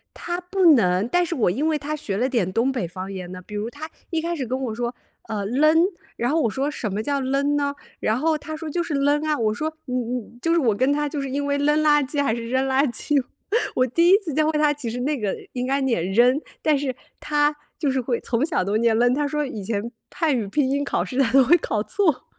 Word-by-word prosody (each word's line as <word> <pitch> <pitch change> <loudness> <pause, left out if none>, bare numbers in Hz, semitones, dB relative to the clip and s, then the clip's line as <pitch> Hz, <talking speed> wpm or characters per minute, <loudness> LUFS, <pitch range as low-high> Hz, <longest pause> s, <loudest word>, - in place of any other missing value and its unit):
他 350 +1 -4
不 370 +1 -1
能， 185 -2 +2
但 355 +5 +2
是 340 - -3
我 225 -8 +2
因 280 - 0
为 310 -1 +1
他 300 +2 -4
学 215 -10 -4
了 250 +5 +1
点 205 -8 0
东 230 +5 +2
北 245 -9 -2
方 185 +3 -7
言 180 -2 -6
呢。 185 - -7
比 210 - -11
如 210 +2 -2
他， 300 +4 -8 0.2
一 330 - 0
开 340 +1 -2
始 265 -5 -3
跟 255 +2 -2
我 240 -5 -3
说， 240 +1 -3 0.3
呃 205 -2 -3
，leng， 310 - +4 0.3
然 240 +2 0
后 320 +2 +2
我 230 - +1
说 275 +5 -1
什 220 -8 -4
么 210 +3 -2
叫 280 +3 -1
leng 275 +2 +1
呢？ 285 -1 0 0.3
然 220 +3 +1
后 315 +2 +2
他 310 +1 -6
说 320 0 -6
就 345 +4 -1
是 330 -3 -4
leng 290 +2 +2
啊。 305 -1 +1
我 215 -2 +1
说 310 +8 -2 0.2
嗯 250 -1 -2
嗯， 240 +1 -12
就 330 - +1
是 340 - +4
我 230 -7 +2
跟 260 +6 +2
他 295 0 0
就 290 0 -4
是 275 -1 -4
因 285 +2 -2
为 285 0 0
，leng 295 +2 +2
垃 295 -1 +4
圾， 285 +1 -1
还 230 -5 +1
是 230 -1 -5
扔 260 +2 +1
垃 270 +2 +3
圾。 285 +2 +1 0.5
我 255 - +3
第 335 +8 +3
一 390 +3 +7
次 360 -8 -6
教 310 0 +2
会 305 - 0
他， 300 -1 +4
其 280 -6 -5
实 245 - -4
那 280 +2 -1
个 205 -3 -1 0.2
应 250 0 -2
该 275 +2 +1
念 230 -10 0
扔。 250 +6 +4 0.2
但 305 -2 +3
是， 270 -2 -2 0.3
他， 295 0 +1 0.2
就 285 -4 0
是 265 - 0
会 240 -1 -1
从 235 +3 0
小 310 - 0
都 200 +3 0
念 225 0 +3
leng。 245 +1 +3
他 295 +1 0
说 300 +1 -1
以 215 -6 -6
前 220 +2 -2 0.2
汉 315 -6 +1
语 220 -4 -2
拼 265 +5 +1
音 280 +1 0
考 - - -1
试 260 - -5
他 260 -4 +3
都 270 0 +6
会 335 +8 +6
考 215 -8 -1
错。 330 - 0
270 Hz, 325 characters per minute, -23 LUFS, 230-300 Hz, 0.5 s, 一